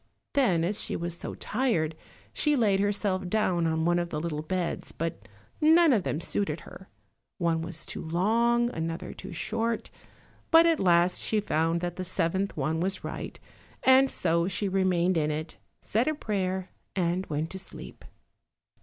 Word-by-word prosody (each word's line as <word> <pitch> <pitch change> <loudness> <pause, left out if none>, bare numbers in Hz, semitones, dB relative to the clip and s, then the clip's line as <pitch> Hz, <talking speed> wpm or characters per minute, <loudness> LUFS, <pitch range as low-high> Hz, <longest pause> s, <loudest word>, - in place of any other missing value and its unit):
Then, 210 - +3
as 195 +4 -1
she - - -3
was 170 0 -3
so - - -7
tired, 215 -11 0 0.4
she 300 -1 +2
laid 210 -6 +3
herself 200 -2 0
down 180 -5 +1
on 160 0 0
one 175 0 +3
of 175 0 -2
the 150 - -3
little 155 -2 -3
beds, 175 +2 -3
but 155 -11 -5 0.3
none 320 0 +6
of 215 - +3
them 155 - -2
suited 165 -3 -1
her; 190 +3 -13 0.5
one 170 -3 +1
was 165 -1 -4
too - - -5
long, 235 +8 +2
another 165 -2 -4
too 190 - -9
short, 225 +6 -2 0.6
but 330 0 +7
at 330 -2 +3
last 175 -1 +3
she 215 - +1
found 165 -3 0
that 175 0 -3
the 185 - -3
seventh 185 +1 -1
one 155 +3 0
was 190 +2 -1
right, - - -6 0.4
and 265 +1 +6
so 170 0 +1
she 195 +2 0
remained 185 -2 +2
in 150 -1 +1
it, 155 +1 -4 0.2
said 225 +6 0
a 310 - +1
prayer 190 -7 -2 0.2
and 180 0 0
went 155 +1 -2
to 190 - -5
sleep. 190 - -8
185 Hz, 170 wpm, -28 LUFS, 165-210 Hz, 0.6 s, but